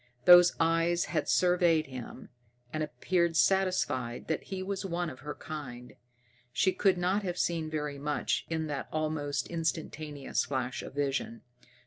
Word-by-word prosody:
Those 175 0 +8
eyes 165 +1 +2
had - - 0
surveyed 175 -3 +3
him, 130 -1 -9 0.4
and 155 - -2
appeared 170 +1 0
satisfied 180 -11 +1
that 160 - -1
he 190 -1 -4
was 195 +1 -3
one 175 -2 -2
of 130 - -12
her 150 0 -6
kind. 125 -6 -8 0.6
She 185 +8 +2
could 195 -3 +2
not 185 +4 +1
have 180 -3 -3
seen 165 -3 0
very 150 -2 -3
much 145 +1 -1
in 160 -1 -1
that 145 -3 -4
almost 155 -2 -1
instantaneous 155 -3 -2
flash 130 -2 -2
of - - -9
vision. 135 -5 -2
160 Hz, 145 wpm, -30 LUFS, 145-175 Hz, 0.6 s, Those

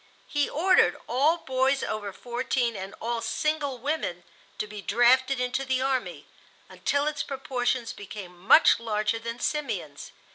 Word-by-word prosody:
He 290 -1 0
ordered 365 +5 +3
all 290 +7 +3
boys 265 -2 +1
over 205 -2 -3
fourteen 240 +1 -2
and 195 0 -7
all 235 0 -2
single 305 -3 -1
women 245 - -3 0.3
to - - -2
be 210 -1 -8
drafted 255 +5 +3
into 250 +2 -1
the 260 -1 0
army, 260 -1 -2 0.4
until 285 0 0
its 300 -1 -1
proportions 255 -3 -2
became 195 -3 -9
much 190 - +6
larger 215 -1 -1
than 230 +1 -6
Simeon's. 300 +3 -3
250 Hz, 140 wpm, -27 LUFS, 225-275 Hz, 0.4 s, much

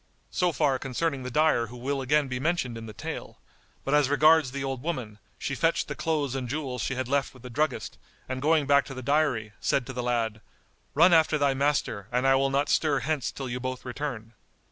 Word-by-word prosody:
So 180 -1 +1
far 135 -3 +1
concerning 135 +2 -2
the 125 - -5
dyer 150 -3 +2
who 125 +3 -10
will 135 +3 -2
again 145 +2 +2
be 125 -1 -3
mentioned 145 -5 -1
in 115 0 -7
the - - -7
tale; 105 - -7 0.5
but 135 - 0
as 150 -2 +4
regards 155 0 +5
the 140 0 -4
old 135 -2 -3
woman, 125 -10 -4 0.2
she 140 - -3
fetched 165 +5 +1
the - - -3
clothes 150 -5 -1
and 130 -3 -3
jewels 135 -4 -3
she 135 - -2
had 130 -1 -2
left 140 0 0
with 130 - -16
the 125 - -8
druggist 150 +6 -2 0.3
and 130 0 -4
going 155 0 +3
back 140 0 +4
to 135 - -8
the 130 - -6
dyery, 140 -6 +1
said 135 - +1
to 130 - -7
the 125 - -3
lad, 115 -3 -1 0.5
"Run 170 +4 +6
after 160 -1 +4
thy 140 -2 +2
master, 135 -7 0
and 125 +2 +1
I 135 - +5
will 135 +1 +3
not 140 +2 +1
stir 145 -2 +2
hence 145 0 -1
till 135 - -6
you 125 0 -3
both 130 0 -5
return." 125 -3 -5
135 Hz, 225 wpm, -27 LUFS, 125-150 Hz, 0.5 s, Run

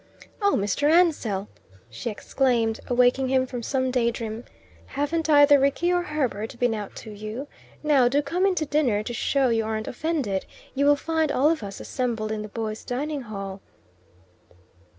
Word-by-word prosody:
"Oh, 405 0 +3
Mr. 205 +9 +1
Ansell!" 290 - +2 0.4
she 120 - -5
exclaimed, 230 0 0
awaking 250 +2 +3
him 260 0 +2
from 250 -2 -6
some 260 +2 -1
day 245 -2 +2
dream. 230 0 -5 0.4
"Haven't 310 +3 -2
either 290 -1 +7
Rickie 280 +6 +2
or 355 - +2
Herbert 260 - -2
been 245 -1 +1
out 210 -2 -6
to 220 - -9
you? 215 +6 -6 0.4
Now, 285 -5 +4
do 285 +4 +2
come 355 +7 +1
into 360 -5 0
dinner, 270 -8 +1
to 240 - -5
show 270 +2 +1
you 225 -1 +1
aren't 220 0 -3
offended. 260 - -2 0.3
You 280 +1 +2
will 290 - +6
find 320 0 0
all 290 +5 +3
of 330 - -2
us 200 -1 -7
assembled 230 -4 -2
in 215 -1 -2
the 215 - -6
boys' 220 0 -4
dining 285 +4 -3
hall." 195 -4 -7
250 Hz, 170 wpm, -25 LUFS, 220-290 Hz, 0.4 s, either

